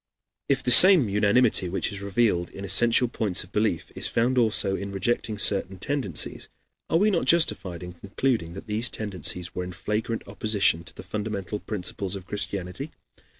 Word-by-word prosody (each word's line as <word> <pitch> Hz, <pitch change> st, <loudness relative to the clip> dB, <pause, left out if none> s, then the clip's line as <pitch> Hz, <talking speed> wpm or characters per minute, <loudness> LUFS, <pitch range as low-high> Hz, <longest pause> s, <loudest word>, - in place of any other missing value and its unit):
If 140 Hz, -, +1 dB
the 125 Hz, -, +2 dB
same 170 Hz, -, +7 dB
unanimity 105 Hz, -1 st, +2 dB
which 95 Hz, -, -3 dB
is 100 Hz, -1 st, -7 dB
revealed 100 Hz, -3 st, 0 dB
in 95 Hz, -, -9 dB
essential 115 Hz, +6 st, +4 dB
points 110 Hz, -6 st, +1 dB
of 90 Hz, -, -18 dB
belief 105 Hz, -5 st, -1 dB
is -, -, -2 dB
found 120 Hz, +3 st, 0 dB
also 110 Hz, -5 st, +2 dB
in 100 Hz, 0 st, -6 dB
rejecting 105 Hz, +2 st, -2 dB
certain 95 Hz, -2 st, +1 dB
tendencies, 115 Hz, -, -1 dB, 0.4 s
are 165 Hz, -, +2 dB
we 210 Hz, +4 st, +2 dB
not 175 Hz, -, 0 dB
justified 95 Hz, -, +1 dB
in 90 Hz, 0 st, -8 dB
concluding 100 Hz, 0 st, -2 dB
that 95 Hz, -, -9 dB
these 110 Hz, +3 st, +2 dB
tendencies 90 Hz, -3 st, -1 dB
were 90 Hz, -, -4 dB
in 90 Hz, 0 st, -8 dB
flagrant 110 Hz, +4 st, -4 dB
opposition 100 Hz, -4 st, 0 dB
to 80 Hz, -, -8 dB
the -, -, -10 dB
fundamental 105 Hz, 0 st, -5 dB
principles 100 Hz, -2 st, -3 dB
of 95 Hz, -2 st, -9 dB
Christianity? 100 Hz, -, -4 dB
100 Hz, 170 wpm, -25 LUFS, 95-115 Hz, 0.4 s, same